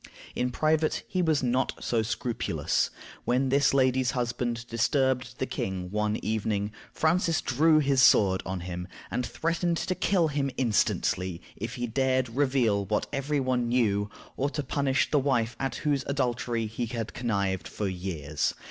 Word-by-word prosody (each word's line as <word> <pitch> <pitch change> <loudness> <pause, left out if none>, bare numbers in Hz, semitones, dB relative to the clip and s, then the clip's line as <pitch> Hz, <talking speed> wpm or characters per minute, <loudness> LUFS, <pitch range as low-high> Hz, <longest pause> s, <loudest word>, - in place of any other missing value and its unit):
In 125 - 0
private 155 +4 +1
he 185 - 0
was 160 -5 +2
not 125 +1 +1
so 115 -2 0
scrupulous. 115 +1 -1 0.3
When 130 +2 +1
this 140 +1 +4
lady's 130 -1 +3
husband 120 -1 -2
disturbed 125 +2 +1
the - - -1
king 95 -1 -4
one 105 0 0
evening, 105 -1 -1 0.2
Francis 165 +1 +2
drew 155 +5 +3
his 140 -3 +3
sword 95 -7 +5
on 95 0 -4
him, 90 0 -5 0.2
and 125 - -1
threatened 170 +5 -1
to 185 - -1
kill 180 -3 +2
him 140 -1 0
instantly 95 -6 +1 0.2
if 115 +3 -5
he 120 - -2
dared 130 +2 +1
to 115 - -11
reveal 125 -6 +2
what 105 +1 0
every 140 +2 0
one 130 -2 0
knew, 105 -4 +2 0.3
or 140 +2 +1
to 150 0 -3
punish 135 0 0
the 150 - +4
wife 120 -4 +1
at 135 -3 -2
whose 145 -2 +2
adultery 120 -4 -1
he 115 +2 -3
had 115 -1 -4
connived 100 -6 -1
for 105 - -3
years. 90 -6 -2
125 Hz, 160 wpm, -28 LUFS, 110-140 Hz, 0.3 s, sword